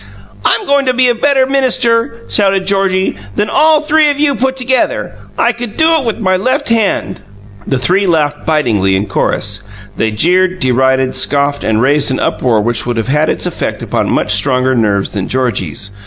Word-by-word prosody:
"I'm -, -, +1 dB
going 280 Hz, -1 st, +1 dB
to 255 Hz, -, +1 dB
be 250 Hz, 0 st, +3 dB
a -, -, +3 dB
better 265 Hz, +2 st, +2 dB
minister," 250 Hz, -3 st, 0 dB
shouted 195 Hz, -2 st, +1 dB
Georgie, 190 Hz, -, 0 dB, 0.2 s
"than 210 Hz, -, -1 dB
all 310 Hz, -1 st, +3 dB
three 305 Hz, 0 st, +2 dB
of 285 Hz, 0 st, -2 dB
you 290 Hz, -1 st, +2 dB
put 265 Hz, 0 st, -1 dB
together. 255 Hz, 0 st, -1 dB, 0.2 s
I -, -, +2 dB
could 235 Hz, -3 st, -8 dB
do 320 Hz, +1 st, +4 dB
it 280 Hz, -, -3 dB
with 230 Hz, -, -2 dB
my 185 Hz, -4 st, 0 dB
left 260 Hz, +8 st, -1 dB
hand!" 225 Hz, -3 st, -1 dB, 0.5 s
The 135 Hz, -, 0 dB
three 185 Hz, +10 st, +1 dB
laughed 150 Hz, -4 st, 0 dB
bitingly 110 Hz, -12 st, +1 dB
in 95 Hz, +2 st, -1 dB
chorus. 100 Hz, -1 st, -2 dB, 0.4 s
They 110 Hz, -, 0 dB
jeered, 180 Hz, -, +1 dB
derided, 130 Hz, -2 st, +1 dB
scoffed, 145 Hz, 0 st, 0 dB
and 110 Hz, +1 st, 0 dB
raised 145 Hz, +2 st, +3 dB
an 130 Hz, -, -1 dB
uproar 115 Hz, -4 st, 0 dB
which 120 Hz, +2 st, -2 dB
would 120 Hz, -1 st, -2 dB
have 115 Hz, +2 st, -2 dB
had 150 Hz, +3 st, +1 dB
its -, -, -1 dB
effect -, -, -4 dB
upon -, -, -2 dB
much 105 Hz, -, 0 dB
stronger 130 Hz, +4 st, +1 dB
nerves 105 Hz, -5 st, 0 dB
than 100 Hz, -3 st, -4 dB
Georgie's. 100 Hz, -, -2 dB
180 Hz, 185 wpm, -13 LUFS, -, 0.5 s, do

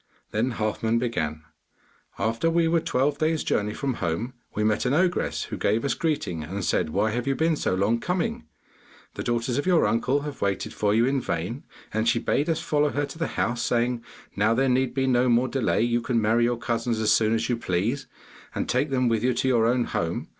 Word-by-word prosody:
Then 115 Hz, +4 st, 0 dB
Halfman 110 Hz, +1 st, 0 dB
began: 80 Hz, -11 st, -2 dB, 0.7 s
'After 115 Hz, -, 0 dB
we 165 Hz, 0 st, +2 dB
were 165 Hz, +1 st, +3 dB
twelve 145 Hz, -1 st, 0 dB
days' 160 Hz, 0 st, +1 dB
journey 105 Hz, 0 st, 0 dB
from 140 Hz, -2 st, -1 dB
home, 95 Hz, +9 st, -2 dB, 0.2 s
we 105 Hz, -, 0 dB
met 110 Hz, 0 st, +1 dB
an 130 Hz, -, +2 dB
ogress, 180 Hz, +2 st, +1 dB
who -, -, -6 dB
gave 110 Hz, +5 st, +1 dB
us 140 Hz, -, +1 dB
greeting 115 Hz, -, -2 dB
and 95 Hz, +4 st, -4 dB
said, -, -, +1 dB
"Why 110 Hz, +7 st, +1 dB
have 120 Hz, +3 st, -3 dB
you 135 Hz, -, +1 dB
been 160 Hz, +2 st, +2 dB
so 95 Hz, -, 0 dB
long 105 Hz, +5 st, +1 dB
coming? 180 Hz, -, -2 dB, 0.7 s
The -, -, -5 dB
daughters 120 Hz, +2 st, -1 dB
of 145 Hz, -, -3 dB
your 180 Hz, -3 st, +4 dB
uncle 125 Hz, +5 st, +1 dB
have 145 Hz, -1 st, -7 dB
waited 100 Hz, -1 st, -1 dB
for 105 Hz, 0 st, +1 dB
you 115 Hz, +2 st, +4 dB
in 135 Hz, 0 st, +1 dB
vain," 90 Hz, -, -3 dB, 0.3 s
and 110 Hz, +2 st, +1 dB
she 115 Hz, -, +2 dB
bade 145 Hz, +6 st, 0 dB
us 160 Hz, -, 0 dB
follow 150 Hz, 0 st, +1 dB
her 145 Hz, 0 st, -1 dB
to 140 Hz, +3 st, -11 dB
the 165 Hz, -, 0 dB
house, 120 Hz, 0 st, 0 dB
saying, 120 Hz, 0 st, 0 dB, 0.3 s
"Now 110 Hz, +3 st, +2 dB
there 135 Hz, +2 st, +2 dB
need 130 Hz, 0 st, +1 dB
be 135 Hz, -1 st, +1 dB
no 125 Hz, -1 st, +3 dB
more 120 Hz, +2 st, +3 dB
delay; 130 Hz, -4 st, +1 dB
you 120 Hz, 0 st, +1 dB
can 115 Hz, 0 st, 0 dB
marry 115 Hz, +2 st, +3 dB
your 120 Hz, 0 st, 0 dB
cousins 115 Hz, -1 st, -1 dB
as 110 Hz, -1 st, +2 dB
soon 110 Hz, 0 st, +3 dB
as 115 Hz, -, -1 dB
you 120 Hz, -, +1 dB
please, 115 Hz, +6 st, -1 dB, 0.5 s
and -, -, -2 dB
take 130 Hz, +4 st, +1 dB
them 130 Hz, -2 st, +1 dB
with 115 Hz, -1 st, +1 dB
you 125 Hz, -1 st, +2 dB
to 130 Hz, -, 0 dB
your 115 Hz, -3 st, +3 dB
own 120 Hz, +1 st, +2 dB
home." 85 Hz, -6 st, -3 dB
120 Hz, 220 wpm, -25 LUFS, 110-135 Hz, 0.7 s, your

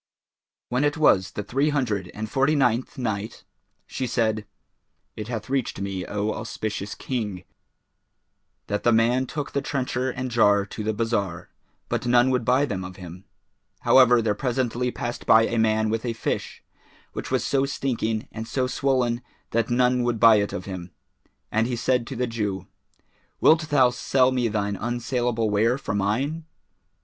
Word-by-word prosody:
When 125 Hz, +3 st, +1 dB
it 145 Hz, +1 st, +1 dB
was 95 Hz, -11 st, +3 dB
the 105 Hz, -, -4 dB
Three 135 Hz, +8 st, +1 dB
Hundred 110 Hz, -11 st, -1 dB
and 110 Hz, +1 st, -4 dB
Forty 135 Hz, +7 st, +2 dB
ninth 125 Hz, -3 st, +1 dB
Night, 110 Hz, -4 st, -3 dB, 0.4 s
She 130 Hz, -, -4 dB
said, 110 Hz, -3 st, 0 dB, 0.7 s
It 105 Hz, -, -6 dB
hath 115 Hz, -2 st, -4 dB
reached 135 Hz, -7 st, -1 dB
me, 95 Hz, -2 st, -4 dB
O 105 Hz, +1 st, -1 dB
auspicious 105 Hz, -2 st, -4 dB
King, 105 Hz, -8 st, -4 dB, 1.2 s
that 105 Hz, -, -2 dB
the 120 Hz, -, +3 dB
man 120 Hz, +3 st, +3 dB
took 145 Hz, +1 st, -4 dB
the 140 Hz, -, -1 dB
trencher 130 Hz, -2 st, -2 dB
and 130 Hz, 0 st, -4 dB
jar 105 Hz, -4 st, +4 dB
to 105 Hz, +2 st, -7 dB
the 110 Hz, -, 0 dB
bazar, 100 Hz, -6 st, -2 dB, 0.4 s
but -, -, -2 dB
none 120 Hz, +1 st, +4 dB
would 125 Hz, -2 st, +1 dB
buy 130 Hz, +5 st, +3 dB
them 100 Hz, -8 st, -4 dB
of 90 Hz, 0 st, -8 dB
him. 90 Hz, +1 st, -10 dB, 0.6 s
However 125 Hz, -3 st, +6 dB
there 105 Hz, -2 st, +1 dB
presently 125 Hz, +1 st, -1 dB
passed 120 Hz, 0 st, -5 dB
by 110 Hz, 0 st, +7 dB
a 115 Hz, -, -1 dB
man 110 Hz, -1 st, +2 dB
with 115 Hz, 0 st, -1 dB
a 120 Hz, -2 st, -2 dB
fish 115 Hz, -, -4 dB, 0.5 s
which -, -, -5 dB
was -, -, +1 dB
so 140 Hz, 0 st, +1 dB
stinking 115 Hz, -5 st, -2 dB
and 110 Hz, 0 st, -6 dB
so 130 Hz, -2 st, 0 dB
swollen 125 Hz, -2 st, 0 dB, 0.3 s
that 115 Hz, 0 st, 0 dB
no 120 Hz, +1 st, +3 dB
one 125 Hz, 0 st, +1 dB
would 120 Hz, -2 st, 0 dB
buy 115 Hz, -1 st, +7 dB
it 100 Hz, 0 st, 0 dB
of 90 Hz, -, -5 dB
him, 90 Hz, -2 st, -6 dB, 0.6 s
and 110 Hz, +1 st, +1 dB
he 125 Hz, -, -2 dB
said 120 Hz, 0 st, 0 dB
to 135 Hz, -, -6 dB
the 125 Hz, +1 st, 0 dB
Jew, 105 Hz, -5 st, -3 dB, 0.7 s
"Wilt 160 Hz, 0 st, +4 dB
thou 130 Hz, -4 st, +4 dB
sell 130 Hz, +1 st, +2 dB
me 125 Hz, -2 st, +1 dB
thine 100 Hz, -2 st, -1 dB
unsaleable 120 Hz, 0 st, -1 dB
ware 115 Hz, +5 st, +2 dB
for 140 Hz, -, -4 dB
mine?" 130 Hz, +11 st, -1 dB
115 Hz, 170 wpm, -24 LUFS, 105-130 Hz, 1.2 s, by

